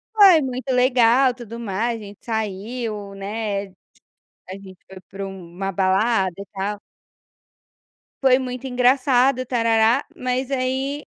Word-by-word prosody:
Foi 385 -7 +7
muito 260 0 -4
legal 250 0 +4
tudo 235 -1 -9
mais. 225 +2 -2
A - - -10
gente 200 0 -13
saiu, 215 -1 -4
né, 200 0 -3 0.8
a 185 - -7
gente 190 -2 -11
foi 190 -1 -11
para 195 0 -6
uma 190 0 -6
balada 190 +1 +1
e 200 - -7
tal. 200 +1 -3 1.4
Foi 260 -1 +5
muito 255 0 -5
engraçado, 255 +1 +3
tarará. 230 +1 +2
Mas 255 +1 -2
aí 270 +2 -2
230 Hz, 125 wpm, -22 LUFS, 200-255 Hz, 1.4 s, Foi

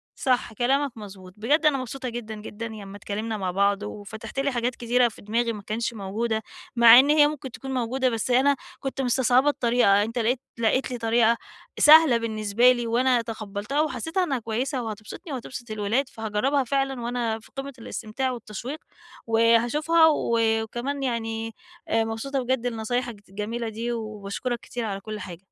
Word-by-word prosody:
صح 250 -3 0
كلامك 270 +4 +1
مضبوط 190 -3 -10
بجد 290 +9 +1
أنا 290 -3 +4
مبسوطة 255 0 -5
جدًا، 225 -2 -6
جدًا 210 +1 -7
لمّا 205 -3 -8
اتكلمنا 215 +2 -4
مع 185 -2 -2
بعض 200 +2 +1
وفتَحت 210 +5 -7
لي 280 0 +1
حاجات 240 0 -1
كتيرة 245 +1 +2
في 220 - -10
دماغي 230 +3 0
ما 210 - -8
كانش 230 +3 -2
موجودة، 220 +2 -2 0.3
مع 235 +1 +9
إن 280 +2 +4
هي 300 -1 +6
ممكن 275 -4 -6
تكون 265 +2 -7
موجودة، 255 +1 0
بس 230 +2 -2
أنا 275 +3 +4 0.2
كنت 270 0 -3
مستصعبة 255 +2 +3
الطريقة، 235 -6 +3
أنت 230 +3 -3
لقيت 235 +3 +1 0.2
لقيت 255 +3 +1
لي 245 - -3
طريقة 230 0 +3 0.4
سهلة 300 -5 +8
بالنسبة 220 +1 +3
لي، 240 -2 -1
وأنا 245 +1 +3
تقبلتها، 220 +4 -3
وحسّيتها 315 - -1
إنّها 275 -7 -1
كويّسة 245 +4 -2
وهتبسطني، 220 - -7
وهتبسط 245 -2 -7
الولاد، 215 +6 0
فهاجربها 225 +6 0
فعلًا 270 0 -1
وأنا 235 -2 -2
في 220 - -19
قِمة 275 0 -5
الاستمتاع 235 +3 -3
والتشويق، 240 +5 -6 0.5
وهاشوفها 240 +9 +4
و 235 -6 +1 0.2
وكمان 270 +5 -4
يعني 225 -2 -3 0.3
آآ 225 0 +2
مبسوطة 245 +5 -3
بجد 245 -1 0
لنصايحك 235 -1 -3
ت 200 - -29
الجميلة 220 +3 -4
دي، 230 +2 -4
وباشكرك 215 +2 -4
كتير 240 -2 -5
على 195 -2 -3
كل 215 0 -6
حاجة. 175 -3 -8
235 Hz, 165 wpm, -25 LUFS, 220-260 Hz, 0.5 s, مع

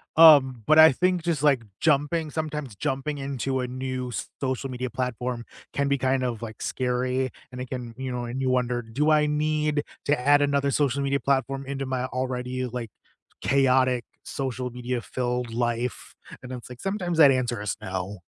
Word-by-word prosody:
um, 140 -7 +7
but, 155 +5 +6
I 160 0 +10
think 180 +4 +1
just, 160 -4 -1
like, 140 -5 +4 0.2
jumping 155 +1 +1
sometimes 150 -7 -4
jumping 135 +7 -2
into 135 -1 -2
a 125 - -2
new 130 0 -4 0.3
social 130 0 -2
media 125 0 -4
platform 125 -1 -3 0.3
can 140 0 0
be 140 0 +2
kind 130 0 +1
of, 120 -3 -2
like, 110 -2 -8
scary, 125 0 -1 0.2
and 125 0 -6
it 130 - -6
can, 125 -3 -5
you 130 -1 -4
know? 125 -1 -3
And, 120 +3 -4
you 130 - +1
wondered, 120 -2 -1
"Do 150 +5 +2
I 150 -1 +4
need 150 0 0 0.2
to 145 -1 +2
add 145 +3 +4
another 140 -1 +2
social 140 -1 +1
media 140 0 +1
platform 135 0 0
into 135 0 -4
my 130 -1 -2
already," 130 0 -3
like, 120 -2 -5 0.5
"chaotic, 130 -2 +3 0.2
social 130 -2 -3
media 125 0 -3
filled 125 -1 -3
life?" 120 +1 -2 0.3
And, 125 - -8
it's, 125 -1 -7
like, 125 - -10
sometimes 190 -4 -2
that 145 -3 +9
answer 120 -4 0
is 105 -3 -2
"No." 95 +1 -4
130 Hz, 180 wpm, -26 LUFS, 125-140 Hz, 0.5 s, I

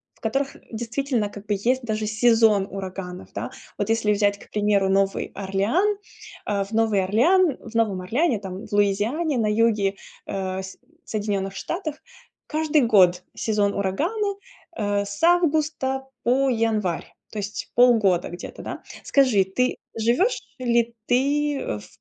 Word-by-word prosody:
в - - -28
которых, 270 +5 -1 0.2
действительно, 235 -1 -1
как 205 0 -11
бы 210 - 0
есть 245 +6 0
даже 215 -2 -2
сезон 215 -2 +4
ураганов, 185 -2 -6
да. - - -4 0.3
Вот 205 +1 -2
если 225 -2 +2
взять, 205 0 +2
к - - -16
примеру, 205 -2 +2
Новый 195 0 +1
Орлеан. 205 - +1 0.5
Э, 200 -1 0
в 200 - -12
Новый 220 -4 +2
Орлеан 285 - +3
в 230 - -11
Новом 205 -5 +1
Орлеане 240 - +1
там, 190 +1 -7
в - - -20
Луизиане, 215 +10 +1
на 220 -2 +1
юге, 210 -2 +2 0.3
э, 190 -1 -3
с 190 - -9 0.3
Соединенных 200 -2 -2
Штатах 330 -4 -4 0.5
каждый 310 -1 +2
год 180 -4 +5
сезон 205 -2 +1
урагана, 360 - -1 0.4
э, 205 -1 0
с 200 +8 -7
августа 310 -6 +2 0.2
по 265 +3 +3
январь, 220 -7 0 0.3
то 215 - -4
есть 205 +1 -5
полгода 220 -8 +4
где-то, 175 - -8
да. - - -6 0.2
Скажи, 255 -9 +4
ты 250 +7 0 0.2
живешь 245 - +2 0.2
ли 235 -1 +1
ты, 285 +3 +1
э, 105 - -3
в - - -13
220 Hz, 145 wpm, -24 LUFS, 200-265 Hz, 0.5 s, год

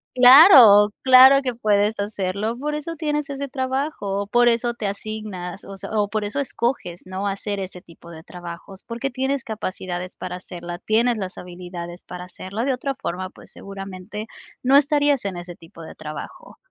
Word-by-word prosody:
Claro, 250 - +9
claro 260 +1 +8
que 250 -3 -2
puedes 210 -1 +1
hacerlo. 205 +2 -2
Por 300 +3 -3
eso 315 +2 -5
tienes 300 -2 -2
ese 280 0 -4
trabajo, 260 -7 -3
por 240 +3 +3
eso 235 +1 0
te 215 -3 -4
asignas, 200 -3 -6
o 195 - -9
sea, - - -8
o 210 -2 +1
por 215 -1 -2
eso 210 +8 -3
escoges, 235 -9 -2
¿no?, 190 +2 -4
hacer 200 +1 -3
ese 185 -1 -7
tipo 170 0 -16
de 160 -1 -11
trabajos, 175 +2 -10
porque 240 +3 -4
tienes 265 +1 -2
capacidades 185 -4 -5
para 180 - -6
hacerla, 175 -1 -8
tienes 230 +2 +1
las 190 -2 -6
habilidades 175 -1 -8
para 180 0 -8
hacerla, 195 +5 -5
de 270 - +1
otra 270 +2 -3
forma, 185 -7 -5
pues, - - -8
seguramente, 195 +1 -8 0.4
no 260 +2 +4
estarías 290 -2 +2
en 190 -3 -3
ese 175 0 -8
tipo 165 0 -15
de - - -11
trabajo. 155 -1 -9
210 Hz, 170 wpm, -22 LUFS, 185-255 Hz, 0.4 s, Claro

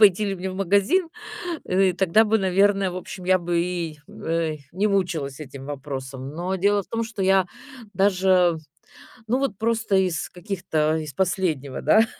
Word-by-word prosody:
пойти 210 -1 +6
ли 195 - -1
мне 190 0 -4
в - - -7
магазин, 200 - +2 0.6
э, 185 0 +2
тогда 190 +4 +4
бы, 220 +1 +2
наверно, 195 0 +2
в - - -6
общем, 185 +1 -7
я 185 +1 +4
бы 170 -1 0
и, 170 -3 -3
э, 165 -1 -2 0.2
не 195 +4 +1
мучилась 170 -9 -1
этим 140 -2 -9
вопросом. 135 -2 -6
Но 180 +3 -2
дело 200 +2 +2
в - - -22
том, 230 0 -2
что 220 -3 -4
я 190 -1 +4 0.5
даже, 185 -3 +3 0.7
ну, 240 +4 +1
вот 265 -8 -2
просто 225 -2 +1
из 185 -4 0
каких-то 175 -5 -1
из 155 -2 -4
последнего 160 -5 -1
да, 220 +9 +5
185 Hz, 165 wpm, -24 LUFS, 165-200 Hz, 0.7 s, пойти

